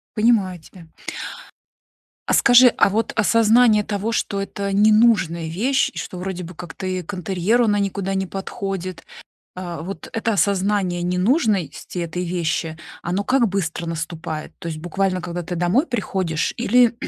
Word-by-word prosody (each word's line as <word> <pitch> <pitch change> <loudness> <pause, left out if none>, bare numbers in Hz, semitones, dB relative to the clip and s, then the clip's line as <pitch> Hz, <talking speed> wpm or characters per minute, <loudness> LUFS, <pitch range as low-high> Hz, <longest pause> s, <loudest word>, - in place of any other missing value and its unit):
Понимаю 210 -6 +2
тебя. 165 +1 -15 1.4
А - - +2
скажи, 245 +1 +7
а - - +6
вот 220 +3 -1
осознание 225 0 +4
того, 210 +1 -2
что 200 -3 -1
это 200 0 -3
ненужная 210 -5 +4
вещь 245 +11 +1
и - - -8
что - - -6
вроде 185 -1 -4
бы 175 +1 -9
как-то 175 +2 -7
и 185 -1 -2
к 190 - -8
интерьеру 190 +6 +1
она 205 -1 +2
никуда 195 -1 -1
не 190 0 -1
подходит, 190 -1 -5 0.5
а, 175 -3 -6
вот 190 +4 -7
это 225 -1 0
осознание 195 -1 +1
ненужности 185 - 0
этой 175 +1 -3
вещи, 160 -2 -2 0.3
оно 185 +4 -1
как 255 -3 +3
быстро 175 -3 -2
наступает? 160 -1 -5
То 170 - -6
есть 155 - -5
буквально 185 +1 -1
когда 175 0 -4
ты 175 +1 -5
домой 180 - +2
приходишь, 185 -8 -1
или 245 +1 +4
190 Hz, 150 wpm, -21 LUFS, 175-215 Hz, 1.4 s, скажи